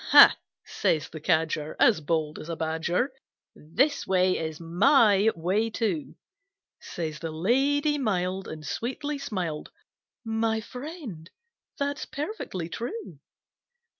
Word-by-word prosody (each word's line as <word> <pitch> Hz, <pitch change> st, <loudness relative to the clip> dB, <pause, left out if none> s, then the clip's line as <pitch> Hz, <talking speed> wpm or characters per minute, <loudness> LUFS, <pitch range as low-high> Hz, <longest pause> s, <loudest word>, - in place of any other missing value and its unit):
"Ha!" -, -, +10 dB, 0.3 s
says 150 Hz, -4 st, 0 dB
the 155 Hz, -, -8 dB
Cadger, 160 Hz, -2 st, 0 dB
As 160 Hz, -, +5 dB
bold 155 Hz, 0 st, -1 dB
as 155 Hz, -, -9 dB
a 165 Hz, -, -2 dB
badger, 160 Hz, -, -1 dB, 0.4 s
"This 265 Hz, -, 0 dB
way 185 Hz, -1 st, +3 dB
is 160 Hz, -1 st, -4 dB
my 205 Hz, -, +4 dB
way 190 Hz, +7 st, 0 dB
too!" 200 Hz, -, -2 dB, 0.6 s
Says 155 Hz, -3 st, -5 dB
the 165 Hz, -, -4 dB
Lady 275 Hz, -, +2 dB
mild, 190 Hz, -5 st, -1 dB
And 155 Hz, -1 st, -8 dB
sweetly 280 Hz, -, -3 dB
smiled, 185 Hz, -, -3 dB, 0.6 s
"My 225 Hz, 0 st, 0 dB
Friend, 250 Hz, -, -8 dB, 0.5 s
that's 285 Hz, +1 st, -2 dB
perfectly 295 Hz, -, -4 dB
true." 245 Hz, -, -6 dB
190 Hz, 115 wpm, -27 LUFS, 160-260 Hz, 0.6 s, Ha